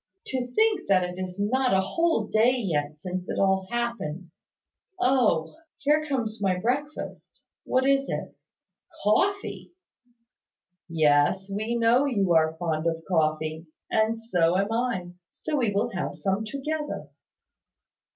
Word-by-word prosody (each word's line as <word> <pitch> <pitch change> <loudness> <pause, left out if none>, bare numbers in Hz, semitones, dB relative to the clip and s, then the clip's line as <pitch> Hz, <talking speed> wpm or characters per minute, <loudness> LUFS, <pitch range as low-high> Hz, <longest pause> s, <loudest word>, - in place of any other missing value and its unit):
To 250 -2 -3
think 435 -3 +2
that 185 -2 +4
it 180 +1 -5
is 185 +1 -5
not 250 +3 +2
a 190 - +4
whole 325 - +1
day 225 +4 +3
yet 155 -9 -2
since 180 +2 -5
it - - -2
all 190 -1 +2
happened! 230 -9 -3 0.7
Oh! 245 - +2 0.2
Here 305 +2 +2
comes 230 -6 -2
my 190 -2 +1
breakfast. 265 +9 -3 0.3
What 260 +1 +2
is 275 0 +2
it? - - -5 0.6
Coffee!" 395 - 0 1.2
"Yes: 155 +4 +2
we 215 +4 -2
know 235 +3 +4
you 200 -10 +1
are 160 0 +3
fond 160 -1 -1
of 165 0 -2
coffee; 155 -1 0 0.2
and 220 +1 +2
so 180 -6 +1
am 200 +3 0
I. 225 -7 -1 0.2
So 300 - -3
we 235 -6 +1
will 200 +1 0
have 185 - -3
some 195 +2 -1
together." 295 +5 -4
205 Hz, 135 wpm, -26 LUFS, 175-255 Hz, 1.2 s, that